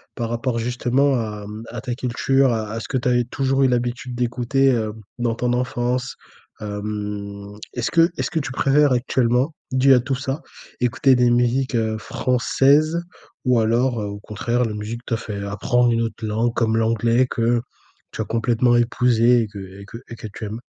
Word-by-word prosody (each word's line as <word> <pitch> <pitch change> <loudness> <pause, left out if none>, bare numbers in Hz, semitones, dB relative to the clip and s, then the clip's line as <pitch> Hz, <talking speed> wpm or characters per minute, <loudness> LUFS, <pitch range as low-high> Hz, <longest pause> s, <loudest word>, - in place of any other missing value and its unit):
par 115 -2 -3
rapport 120 +1 -1
justement 125 +3 +1
à 105 -3 -3
mmh, 105 +2 -8
à 120 -1 -6
ta 125 -2 -3
culture, 130 +1 +1
à 110 -1 -3
à 115 - -3
ce - - -7
que 135 - -1
tu 125 0 0
as 125 - +3
eu 120 - +1
toujours 135 +1 +1
eu 130 - +5
l'habitude 125 0 -2
d'écouter, 125 +3 +1
heu, 110 -2 -1 0.3
dans 115 -1 0
ton 125 0 0
enfance? 125 +1 -1 0.5
Hem, 105 -1 -5 0.2
est-ce 120 -1 -2
que 165 +1 +5
est-ce - - -2
que 160 - 0
tu 130 -2 -4
préfères 140 +2 +3
actuellement, 125 +3 +1 0.2
dû 130 +1 +5
à 125 - +6
tout 135 +2 -2
ça, 135 +3 -3 0.4
écouter 125 +2 +3
des 125 -1 +3
musiques, 125 +2 +1
heu, 110 -1 0
françaises, 140 +8 +2 0.4
ou 125 -2 +4
alors, 115 +1 +1
heu, - - -3
au 100 0 -6
contraire 115 +4 -1
la 110 - -3
musique 110 +3 -5
t'a 115 - -1
fait 100 -3 -6
apprendre 120 +5 +1
une 115 0 +1
autre 115 -1 -5
langue, 115 +2 0
comme 115 -1 +1
l'anglais, 115 +2 +2
que 115 0 +1 0.5
tu - - -4
as - - -2
complètement 120 +1 +2
épousée 120 0 +3
et 110 - -2
que 105 -1 -10
et 95 +1 -10
que 115 - -9
et 115 - -7
que 110 - -8
tu 110 - -6
aimes? 110 +3 -6
120 Hz, 195 wpm, -22 LUFS, 110-125 Hz, 0.5 s, à